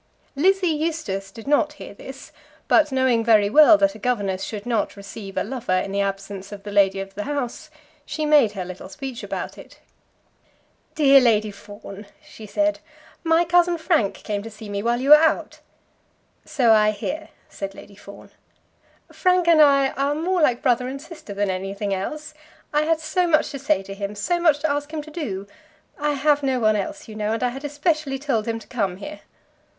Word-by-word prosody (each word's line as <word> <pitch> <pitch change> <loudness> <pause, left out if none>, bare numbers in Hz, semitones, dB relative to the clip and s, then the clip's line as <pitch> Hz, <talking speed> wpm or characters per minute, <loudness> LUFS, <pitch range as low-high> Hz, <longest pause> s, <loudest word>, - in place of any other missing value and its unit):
Lizzie 380 +6 +3
Eustace 295 -12 -3
did 225 +3 -12
not 300 +1 +2
hear 295 - -10
this; 265 +6 -11 0.4
but 305 -2 +4
knowing 260 -3 +2
very 215 -3 +4
well 310 +3 +8
that 295 -1 +2
a - - -12
governess 205 -5 -1
should 210 -2 -6
not 230 -4 -1
receive 195 0 -9
a - - +1
lover 225 -5 -2
in 195 - -2
the 200 0 0
absence 195 0 -4
of 200 -1 -9
the 205 - -7
lady 195 -1 +3
of 195 0 -7
the 205 +1 -5
house, 285 +1 -4 0.3
she 310 +1 -3
made 290 -8 +4
her 190 -3 -5
little 185 +1 -9
speech 245 +6 -7
about - - -6
it. - - -14 1.2
"Dear 275 -3 +6
Lady 215 -3 +2
Fawn," 205 0 -11
she 220 - -13
said, 305 +7 0 0.4
"my 330 +1 +3
cousin 350 0 +3
Frank 320 - +1
came 205 -2 -4
to 225 - -8
see 215 -1 -11
me 200 0 -3
while 235 +2 0
you 275 +3 +1
were - - +13
out." 320 - 0 0.9
"So 240 -4 +2
I 215 -1 +4
hear," 305 +9 -4 0.2
said 195 0 -7
Lady 205 - -13
Fawn. 200 0 -13 0.8
"Frank 365 -2 +2
and 330 -2 +6
I 275 -2 +5
are 280 +2 -1
more 350 +3 0
like 250 -5 +2
brother 250 -1 +2
and 270 +2 -5
sister 310 - -10
than 200 -1 0
anything 195 +2 -3
else. 305 +11 -5 0.4
I 300 +1 +2
had 325 0 +1
so 320 +3 0
much 310 -2 +2
to 275 - -6
say 280 -5 +1
to 195 - -8
him; 200 +1 -5
so 345 - -1
much 315 -4 +3
to 315 -1 +1
ask 290 +1 -3
him 310 -2 -4
to 310 - -12
do! 210 - -4 0.5
I 295 0 0
have 290 +1 +2
no 265 -2 0
one 215 -2 +3
else, 200 -2 -4
you 220 - -9
know, 215 0 -2
and 230 - -2
I 250 - +2
had 270 +4 -8
especially 295 -1 -1
told 260 -6 -1
him 225 0 -1
to 225 - -12
come 195 -7 -2
here." 300 +9 -8
250 Hz, 200 wpm, -23 LUFS, 205-300 Hz, 1.2 s, were